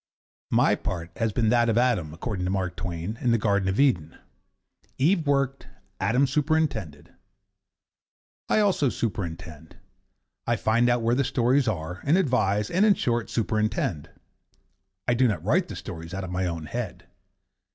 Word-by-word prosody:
My - - +3
part 85 -2 -4
has 115 -1 0
been 110 +1 +1
that 120 0 +3
of 115 - +1
Adam, 115 -11 +1
according 90 +4 -4
to - - -1
Mark 95 -2 -2
Twain, 85 +5 -5
in 125 - +1
the 115 - +4
Garden 100 -3 +1
of 95 - -1
Eden. 90 - +2 0.8
Eve 160 +3 +2
worked, 140 -1 0 0.3
Adam 125 +4 +2
superintended. 140 - -1 1.4
I 215 - +3
also 190 -9 +2
superintend. 85 -8 -5 0.7
I - - +2
find 120 +2 +2
out 120 -1 +1
where 115 +1 +2
the 135 +3 +2
stories 130 +1 +2
are, 90 -2 -3
and 155 +6 +3
advise, 105 - +1
and, 185 +4 +3
in 210 -2 +5
short, 120 -6 -1
superintend. 110 -8 -1 1.0
I 120 - +3
do 125 +1 +3
not 90 -7 -2
write 170 - +2
the - - -7
stories 85 +1 -7
out 95 - -4
of 90 - -6
my 90 0 -1
own 85 -2 -4
head. 110 -1 -5
110 Hz, 160 wpm, -26 LUFS, 90-130 Hz, 1.4 s, in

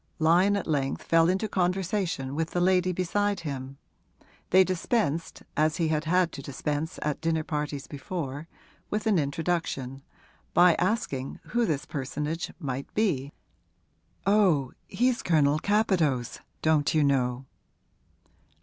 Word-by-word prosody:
Lyon 175 +5 +4
at 200 - -2
length 140 -4 -1
fell 165 0 +4
into 190 +4 0
conversation 180 -6 -1
with 160 +2 -1
the 175 - -1
lady 185 0 +3
beside 195 +2 0
him 135 -3 -6 0.7
they 190 +1 +6
dispensed, 175 -3 -1
as 155 +1 +2
he 165 -2 +1
had 155 0 0
had 180 +1 +2
to 140 - -7
dispense 145 +4 -3
at 150 -1 -2
dinner 160 -1 0
parties 150 -2 -3
before, 145 0 -5 0.4
with 210 +1 -2
an 210 -5 +3
introduction 140 -3 -2 0.5
by 175 -1 +7
asking 175 - -1
who 240 -1 +1
this 150 -3 -1
personage 150 +4 -3
might 135 -5 -5
be. 150 -11 0 0.9
'Oh, 185 -10 +3 0.2
he's 250 +1 +1
Colonel 150 -3 +3
Capadose, 170 - +1 0.2
don't 155 -1 +2
you 155 - +4
know?' 130 -2 +1
160 Hz, 130 wpm, -27 LUFS, 140-185 Hz, 0.9 s, by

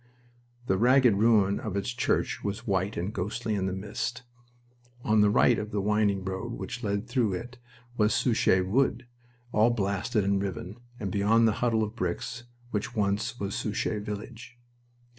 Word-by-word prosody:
The 95 -4 +1
ragged 125 0 +5
ruin 105 -2 +3
of 105 -4 -5
its 100 - -2
church 120 - 0
was 105 +3 -4
white 95 0 0
and 95 +5 -3
ghostly 110 +4 -3
in 95 -2 0
the - - -1
mist. 105 +6 -4 0.8
On 110 -1 +3
the 105 - +5
right 115 +3 +4
of 105 - -4
the 105 - -2
winding 100 -1 +1
road 95 +5 -4
which 120 +1 -6
led 100 +2 -1
through 120 -5 +1
it 120 +5 -6 0.4
was 105 0 +3
Souchez 110 -6 +3
Wood, 125 +3 +1 0.5
all 110 +2 +4
blasted 100 0 0
and 100 0 +1
riven, 100 +1 -5 0.2
and 100 -5 -3
beyond 110 +4 +3
a - - +4
huddle 115 0 +1
of 110 +1 -5
bricks 115 +4 -3 0.3
which 115 +3 -3
once 105 +3 -1
was 100 0 -3
Souchez 105 0 -2
village. 115 +4 -7
105 Hz, 165 wpm, -28 LUFS, 100-115 Hz, 0.8 s, ragged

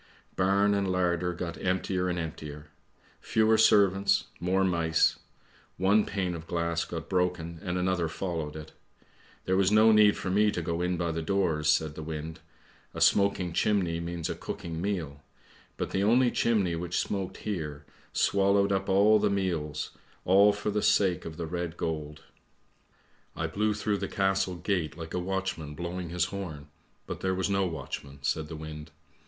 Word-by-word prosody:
" - - -36
Barn 100 +2 +3
and 100 -2 0
larder 90 -1 +1
got 85 -1 -5
emptier 95 0 0
and 90 - -1
emptier. 75 -2 -6 0.5
Fewer 110 0 +3
servants; 100 -2 +4 0.2
more 95 +2 +1
mice. 85 -3 +2 0.6
One 100 +3 +3
pane 95 -3 -2
of 85 0 -8
glass 85 -1 -1
got 85 -1 -6
broken 90 -3 -1
and 90 -2 -2
another 90 -2 0
followed 80 -4 -4
it. 80 0 -8 0.7
There 95 - +1
was 95 0 +3
no 110 +1 +6
need 105 -1 +5
for 95 - -3
me 105 +2 +4
to 90 - -2
go 85 +1 -2
in 90 0 0
by 85 0 -1
the 80 0 -3
doors," 80 -4 0
said 75 0 +2
the 80 - -8
wind. 80 +1 -6 0.3
" - - -31
A - - -4
smoking 100 -3 +3
chimney 90 -4 +1
means 85 -1 -4
a - - -2
cooking 80 -1 -6
meal, 85 -8 -3 0.6
but - - -3
the 95 - 0
only 120 +4 +4
chimney 100 -7 +1
which 85 +1 -3
smoked 95 -2 -2
here, 75 -8 -5 0.3
swallowed 100 0 +2
up 95 0 0
all 105 +3 +5
the 105 0 +2
meals, 80 -7 -2 0.3
all 100 +3 +6
for 105 +1 -3
the 105 +1 0
sake 95 -5 +2
of 80 -1 -7
the 85 - -3
red 85 0 -4
gold. 75 -1 -4 0.6
" - - -37
I 80 - -2
blew 105 +6 0
through 105 -1 -1
the - - -3
castle 95 -2 0
gate 85 -3 -2
like 80 -1 -7
a 90 - 0
watchman 90 -5 -3
blowing 85 +1 -5
his 90 0 0
horn, 80 -7 -6 0.4
but - - -6
there 95 0 0
was 95 +2 -1
no 95 -1 +2
watchman," 70 -4 -6
said 75 +2 -1
the 80 - -7
wind. 75 0 -8
90 Hz, 175 wpm, -28 LUFS, 80-100 Hz, 0.7 s, no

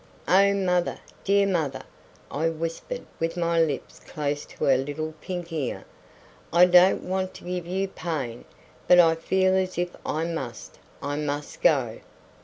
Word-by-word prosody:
"Oh, 200 +2 +5
mother! 180 -3 +1 0.3
dear 200 0 +3
mother," 160 -8 -1 0.5
I 160 +3 0
whispered, 165 - -5
with 165 +1 -1
my 170 -1 +2
lips 150 -4 -2
close 145 -1 -4
to - - -8
her 135 - +5
little 145 +4 -3
pink 175 -2 -5
ear, 145 -6 -3 0.7
"I 175 +2 +7
don't 180 +1 +5
want 185 0 -2
to - - -11
give 180 -1 -4
you 190 +2 -1
pain, 155 -10 -4 0.4
but 180 - +7
I 165 -2 +7
feel 185 +3 +1
as 185 -1 0
if 175 0 -2
I 160 +2 -1
must 130 -10 -6 0.2
I 145 +1 -2
must 145 -1 -4
go." - - +2
170 Hz, 155 wpm, -26 LUFS, 150-185 Hz, 0.7 s, I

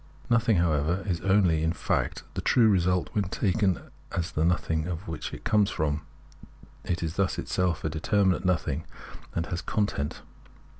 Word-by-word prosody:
Nothing, 115 -3 +4
however, 85 +2 +1
is 90 -4 -1
only, 95 -5 +3
in 80 +1 +1
fact, - - -1
the - - -3
true 120 -3 +4
result, 90 -3 +2
when 105 -2 +1
taken 95 -1 +1 0.3
as 85 -1 -2
the 75 - 0
nothing 80 -2 +1
of 90 +2 -5
what 80 -2 -5
it - - -8
comes 105 -2 +3
from; 75 -1 -1 0.8
it 85 -2 -2
is 80 +2 -3
thus 100 -1 +1
itself 90 -3 -1
a - - 0
determinate 90 +4 +1
nothing, 80 -5 0 0.5
and 85 - 0
has 85 +1 -3
a - - -8
content. 100 -9 -1
90 Hz, 165 wpm, -27 LUFS, 80-100 Hz, 0.8 s, Nothing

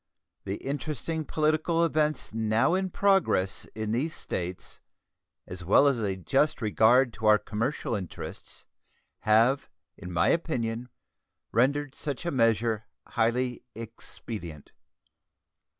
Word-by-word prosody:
The 100 0 -2
interesting 150 +4 -3
political 155 +3 +1
events 155 -6 0
now 110 +5 +2
in 190 0 0
progress 180 - +2
in 110 -1 -3
these 140 +8 -1
States, 90 0 -4 0.7
as 90 0 -8
well 100 - +5
as 140 -4 +3
a 100 -3 -1
just 135 - +1
regard 115 +2 +4
to 110 - -2
our 105 0 +7
commercial 115 +5 -2
interests, 95 -6 -6 0.5
have, 115 +6 +3 0.3
in 90 - -9
my 85 -1 +2
opinion, 125 -8 -1 0.6
rendered 140 +4 +1
such 145 +3 -4
a 170 - 0
measure 115 -3 +1 0.2
highly 125 +2 0
expedient. 105 - -8
115 Hz, 115 wpm, -28 LUFS, 110-150 Hz, 0.7 s, our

